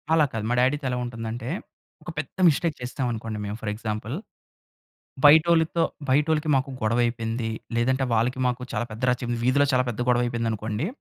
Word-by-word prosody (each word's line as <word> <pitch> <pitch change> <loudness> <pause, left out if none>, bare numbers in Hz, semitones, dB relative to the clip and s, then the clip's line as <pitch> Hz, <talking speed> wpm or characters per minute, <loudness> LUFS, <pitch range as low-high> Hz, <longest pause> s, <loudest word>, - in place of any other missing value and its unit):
అలా 160 -2 +5
కాదు. 110 -1 -3
మా - - +2
డ్యాడీతో 135 +3 +1
ఎలా 125 - -1
ఉంటుందంటే, 115 0 -5 0.5
ఒక - - -8
పెద్ద 150 - -6
మిస్టేక్ 160 +1 0
చేసేసామనుకోండి 120 -4 -3
మేము, 100 +1 -4
ఫర్ 105 - -2
ఎగ్జాంపుల్. 110 +3 -4 1.1
బయటోళ్ళితో 160 +2 +5 0.3
బయటోళ్ళకి 150 +3 +2
మాకు 135 +1 +1
గొడవయిపోయింది. 115 0 0 0.3
లేదంటే 130 +3 +2
వాళ్ళకి 120 +3 +1
మాకు 125 0 -1
చాలా - - -1
పెద్ద 110 +3 -8
రచ్చ 125 +1 -1
మ్ 120 - 0
వీధిలో 135 +4 +3
చాలా 130 0 +3
పెద్ద 120 -1 -4
గొడవయిపోయిందనుకోండి. 115 -1 0
125 Hz, 155 wpm, -25 LUFS, 115-140 Hz, 1.1 s, అలా